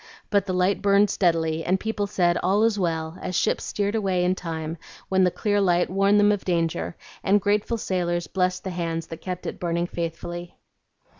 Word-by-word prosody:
But 200 Hz, -2 st, +2 dB
the 185 Hz, -, -1 dB
light 180 Hz, +2 st, +1 dB
burned 200 Hz, 0 st, +4 dB
steadily, 165 Hz, -3 st, +1 dB
and 185 Hz, +2 st, +1 dB
people 210 Hz, -1 st, -2 dB
said, 175 Hz, -3 st, +2 dB
'All 195 Hz, +4 st, +2 dB
is 225 Hz, -2 st, +2 dB
well,' 165 Hz, -1 st, -2 dB
as 185 Hz, -1 st, -4 dB
ships -, -, +1 dB
steered 205 Hz, 0 st, -1 dB
away 190 Hz, -5 st, +1 dB
in 180 Hz, -, +3 dB
time, 165 Hz, -2 st, -5 dB, 0.3 s
when 190 Hz, 0 st, +3 dB
the 180 Hz, -, +5 dB
clear 205 Hz, +2 st, 0 dB
light 175 Hz, -2 st, +2 dB
warned 195 Hz, +2 st, +4 dB
them 205 Hz, 0 st, +5 dB
of 205 Hz, -2 st, -1 dB
danger, 165 Hz, -, -1 dB, 0.3 s
and 200 Hz, +2 st, +4 dB
grateful 210 Hz, +3 st, 0 dB
sailors 175 Hz, -4 st, -1 dB
blessed 180 Hz, +2 st, -1 dB
the 190 Hz, -, -4 dB
hands 165 Hz, -2 st, -3 dB
that 165 Hz, 0 st, -9 dB
kept 180 Hz, -1 st, -5 dB
it -, -, -5 dB
burning 170 Hz, 0 st, 0 dB
faithfully." 175 Hz, 0 st, -5 dB
180 Hz, 195 wpm, -25 LUFS, 170-200 Hz, 0.3 s, the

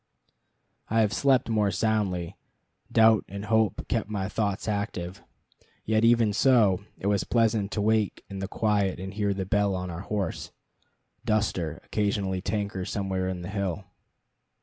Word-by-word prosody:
I 115 Hz, +1 st, +3 dB
have 105 Hz, -2 st, +1 dB
slept 135 Hz, -3 st, +3 dB
more 105 Hz, -3 st, +2 dB
soundly; 95 Hz, -4 st, -1 dB, 0.6 s
doubt 110 Hz, -2 st, +5 dB
and 100 Hz, +1 st, -6 dB
hope 110 Hz, -1 st, +1 dB
kept -, -, -1 dB
my 100 Hz, -3 st, -2 dB
thoughts 105 Hz, -1 st, -2 dB
active. 100 Hz, -3 st, -3 dB, 0.6 s
Yet 110 Hz, +1 st, +2 dB
even 115 Hz, -2 st, +4 dB
so, 105 Hz, -6 st, +4 dB
it -, -, -9 dB
was 100 Hz, -1 st, +2 dB
pleasant 110 Hz, -3 st, +1 dB
to 105 Hz, -, -1 dB
wake 110 Hz, -1 st, +1 dB
in 100 Hz, -1 st, -7 dB
the 95 Hz, -, -3 dB
quiet 105 Hz, -3 st, 0 dB
and 95 Hz, +1 st, -6 dB
hear 100 Hz, -1 st, 0 dB
the 95 Hz, -1 st, -3 dB
bell 100 Hz, 0 st, +1 dB
on 90 Hz, -1 st, -4 dB
our 85 Hz, +1 st, -6 dB
horse, 100 Hz, -1 st, -3 dB, 0.7 s
Duster, 105 Hz, -8 st, 0 dB
occasionally 100 Hz, -3 st, -1 dB
tankle 100 Hz, -1 st, -2 dB
somewhere 95 Hz, -2 st, -2 dB
on 90 Hz, -1 st, -4 dB
the 90 Hz, -, -6 dB
hill. 100 Hz, -2 st, -2 dB
100 Hz, 150 wpm, -27 LUFS, 95-110 Hz, 0.7 s, doubt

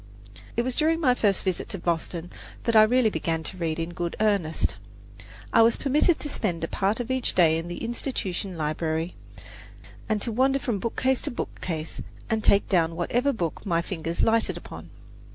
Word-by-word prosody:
It 235 Hz, -, +3 dB
was 255 Hz, +1 st, -1 dB
during 325 Hz, +1 st, +2 dB
my 260 Hz, -6 st, +4 dB
first 205 Hz, -5 st, +2 dB
visit 185 Hz, -3 st, -2 dB
to -, -, -4 dB
Boston 170 Hz, 0 st, -2 dB, 0.3 s
that 230 Hz, -2 st, 0 dB
I 215 Hz, -, +9 dB
really 225 Hz, +1 st, +4 dB
began 165 Hz, -4 st, -1 dB
to 185 Hz, +4 st, -6 dB
read 165 Hz, -3 st, -1 dB
in 165 Hz, +1 st, -3 dB
good 170 Hz, -1 st, -3 dB
earnest. 185 Hz, -, +1 dB, 0.8 s
I 230 Hz, -, +7 dB
was 225 Hz, +1 st, +5 dB
permitted 300 Hz, +4 st, +2 dB
to -, -, -2 dB
spend 180 Hz, -, -2 dB
a -, -, 0 dB
part 200 Hz, +7 st, 0 dB
of 245 Hz, +1 st, -3 dB
each 260 Hz, -1 st, 0 dB
day 165 Hz, -2 st, +5 dB
in 165 Hz, -, -6 dB
the 175 Hz, -, -6 dB
Institution 200 Hz, -7 st, -3 dB
library, 160 Hz, +2 st, -1 dB, 1.0 s
and 215 Hz, -1 st, +1 dB
to 235 Hz, -, -2 dB
wander 265 Hz, +4 st, +3 dB
from 240 Hz, -7 st, -2 dB
bookcase 260 Hz, +4 st, 0 dB
to -, -, -1 dB
bookcase, 165 Hz, -8 st, -4 dB, 0.3 s
and 220 Hz, -1 st, 0 dB
take 200 Hz, -, +4 dB
down 165 Hz, -3 st, +2 dB
whatever 245 Hz, +11 st, +1 dB
book 175 Hz, -, -3 dB
my 170 Hz, -3 st, 0 dB
fingers 165 Hz, -2 st, -2 dB
lighted 225 Hz, 0 st, +2 dB
upon. -, -, -10 dB
195 Hz, 185 wpm, -26 LUFS, 165-240 Hz, 1.0 s, I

